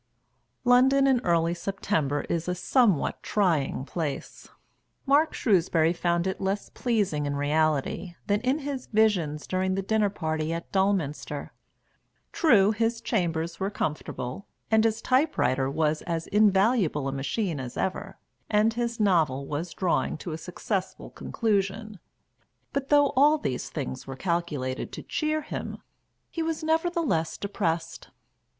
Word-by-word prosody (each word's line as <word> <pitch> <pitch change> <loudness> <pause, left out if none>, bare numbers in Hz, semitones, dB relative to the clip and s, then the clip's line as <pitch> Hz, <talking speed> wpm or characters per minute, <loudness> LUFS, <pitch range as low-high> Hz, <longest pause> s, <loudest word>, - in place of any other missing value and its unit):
London 260 +2 +5
in 265 -3 +3
early 170 -1 +2
September 165 -6 -1
is 170 0 -3
a 180 - 0
somewhat 200 - +2
trying 160 -10 0
place. 150 -3 -5 0.6
Mark 295 +3 +4
Shrewsbury 170 -6 +2
found 170 0 0
it 190 +1 -2
less 195 +1 -2
pleasing 200 - 0
in 140 - -2
reality 155 +4 0
than 205 +1 +1
in 260 +3 +1
his 275 -3 -4
visions 185 -9 +1
during 185 0 0
the 195 - -2
dinner 215 +1 +2
party 160 -4 -2
at 170 0 -6
Dulminster. 190 -7 -1 0.8
True, 215 - +4
his 230 +1 0
chambers 170 -8 -1
were 195 - -1
comfortable, 150 -3 -4 0.2
and 220 0 +4
his 225 0 0
type 275 +5 +2
writer 130 +1 +1
was 155 +1 0
as 165 -2 -3
invaluable 200 - +3
a - - -1
machine 145 +5 -2
as 125 -2 -6
ever, 190 +1 -3 0.3
and 215 +1 +3
his 235 0 -2
novel 160 -10 +2
was 155 +5 -4
drawing 180 -4 0
to 170 - -6
a 155 - -3
successful 185 +3 -4
conclusion; 210 -1 -2 0.7
but 275 -1 -2
though 290 -1 +5
all 295 +4 +5
these 130 - -3
things 130 -4 -5
were 135 - -5
calculated 150 -6 -2
to - - -7
cheer 310 0 -1
him, 310 - -5 0.5
he 330 - -3
was 320 -1 -2
nevertheless 320 - 0
depressed. 175 -5 -3
190 Hz, 140 wpm, -27 LUFS, 160-225 Hz, 0.8 s, London